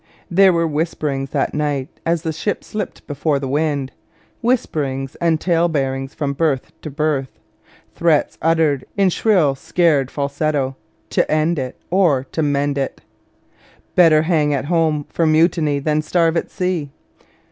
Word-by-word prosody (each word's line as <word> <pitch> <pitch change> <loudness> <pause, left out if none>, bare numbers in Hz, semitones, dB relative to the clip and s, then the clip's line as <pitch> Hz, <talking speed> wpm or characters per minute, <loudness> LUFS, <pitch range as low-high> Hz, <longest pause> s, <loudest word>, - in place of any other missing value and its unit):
There 190 +2 +6
were 165 -1 +1
whisperings 150 -3 -2
that - - -1
night 145 -3 -1 0.2
as 165 0 +1
the 160 -2 -2
ship 205 +7 -3
slipped 210 -3 -6
before 145 0 -1
the 135 -1 -4
wind, 145 -1 -1 0.5
whisperings 140 - -1
and 165 -2 +1
tale 170 -1 +2
bearings 135 -3 -2
from 140 -2 -2
berth 140 -3 -1
to 155 - -6
berth, 145 -2 -2 0.6
threats 165 -3 +1
uttered 160 -4 +2
in 195 -2 +3
shrill 180 -9 +3
scared 145 -1 +1
falsetto 140 -1 -1 0.4
'to - - +1
end 155 +1 +1
it 130 -1 -5
or 170 -9 +3
to 160 - -1
mend 145 -1 0
it; 135 - -3 0.9
better 160 -3 +5
hang 155 -3 +2
at 135 - -2
home 160 -3 +1
for 165 - 0
mutiny 155 -2 +3
than 150 +2 0
starve 165 +1 +1
at 165 - -1
sea.' 180 -6 -2
155 Hz, 145 wpm, -19 LUFS, 140-165 Hz, 0.9 s, There